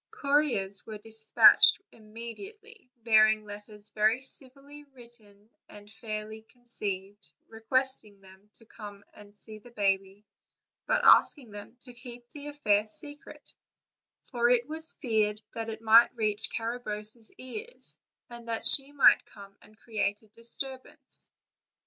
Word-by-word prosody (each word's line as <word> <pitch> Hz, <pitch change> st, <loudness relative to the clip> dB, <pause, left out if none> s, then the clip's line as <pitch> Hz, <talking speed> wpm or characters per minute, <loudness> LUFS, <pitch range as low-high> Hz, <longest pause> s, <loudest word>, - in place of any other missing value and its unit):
Couriers 275 Hz, -10 st, 0 dB
were 215 Hz, -1 st, -7 dB
dis 220 Hz, +1 st, -5 dB
patched -, -, +7 dB
immediately, 250 Hz, -, -11 dB
bearing 215 Hz, -1 st, +4 dB
letters 210 Hz, 0 st, -10 dB
very 215 Hz, +3 st, +2 dB
civilly 275 Hz, +2 st, -5 dB
con 270 Hz, -4 st, -16 dB
ceived 215 Hz, -3 st, -5 dB, 0.2 s
and 205 Hz, 0 st, -14 dB
fairly 220 Hz, -1 st, -7 dB
written, 205 Hz, -5 st, -5 dB, 0.3 s
requesting 225 Hz, -2 st, 0 dB
them 190 Hz, +1 st, -19 dB
to 225 Hz, -, -21 dB
come 205 Hz, -2 st, -11 dB
and 205 Hz, 0 st, -16 dB
see 215 Hz, +1 st, -12 dB
the 245 Hz, -, -16 dB
baby, 195 Hz, -2 st, -1 dB, 0.6 s
but -, -, +1 dB
asking 255 Hz, -8 st, +5 dB
them 205 Hz, +4 st, -11 dB
to 250 Hz, -, -12 dB
keep 240 Hz, 0 st, -11 dB
the 290 Hz, -1 st, -9 dB
affair 215 Hz, -8 st, +1 dB
secret, 290 Hz, +7 st, -7 dB, 0.7 s
for 240 Hz, -2 st, 0 dB
it 245 Hz, 0 st, +2 dB
was 320 Hz, +1 st, -2 dB
feared 215 Hz, -5 st, 0 dB
that 225 Hz, 0 st, -5 dB
it 225 Hz, 0 st, -8 dB
might 225 Hz, +1 st, +7 dB
reach 220 Hz, -1 st, -1 dB
Carabosse's 225 Hz, -1 st, -4 dB
ears, 425 Hz, -, -7 dB, 0.3 s
and 235 Hz, -1 st, -12 dB
that 225 Hz, -1 st, -3 dB
she 275 Hz, 0 st, +2 dB
might 290 Hz, -1 st, +5 dB
come 200 Hz, -1 st, -14 dB
and 215 Hz, 0 st, -20 dB
create 215 Hz, -2 st, -3 dB
a -, -, -22 dB
disturbance. 260 Hz, +5 st, -3 dB
225 Hz, 135 wpm, -28 LUFS, 210-255 Hz, 0.7 s, patched